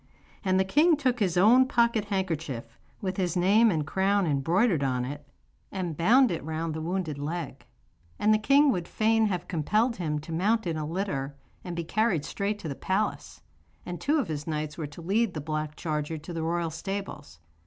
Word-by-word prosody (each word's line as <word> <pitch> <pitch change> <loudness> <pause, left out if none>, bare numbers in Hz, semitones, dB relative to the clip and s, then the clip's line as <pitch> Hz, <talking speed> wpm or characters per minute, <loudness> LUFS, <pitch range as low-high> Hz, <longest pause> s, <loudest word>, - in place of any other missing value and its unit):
And 185 -1 +2
the 190 - +2
king 300 - +4
took 255 -4 0
his 185 -4 +1
own 240 +8 +6
pocket 235 -4 +2
handkerchief, 160 - -3 0.3
with 190 -1 -3
his 180 -2 0
name 205 +6 +5
and 155 -6 0
crown 195 +4 +1
embroidered 165 - +2
on 125 -2 0
it, 145 +2 -7 0.4
and 180 -5 -3
bound 240 - +4
it 165 - -3
round 160 +1 -3
the 160 - -4
wounded 165 -3 -3
leg. 160 +1 -5 0.5
And 215 +1 +3
the 215 - +3
king 280 +5 +5
would 175 -5 -2
fain 225 0 +2
have 180 -3 -3
compelled 215 - +1
him 155 -4 -2
to 155 - -10
mount 210 +7 +1
in 165 -2 -1
a 155 -1 -3
litter 150 -6 -3 0.3
and 175 -2 -5
be 170 - -2
carried 190 -4 0
straight 205 +1 -2
to 165 - -5
the 145 - -3
palace, 190 +9 -2 0.4
and 175 -1 -6
two 295 +3 +2
of 270 -9 0
his 150 -1 -5
knights 155 -1 -3
were 155 -3 -4
to 145 +4 -11
lead 205 +2 +1
the - - -2
black 155 0 -3
charger 155 0 -3
to 160 +3 -8
the 165 - -3
royal 165 0 -1
stables. 195 - -6
175 Hz, 195 wpm, -27 LUFS, 155-210 Hz, 0.5 s, own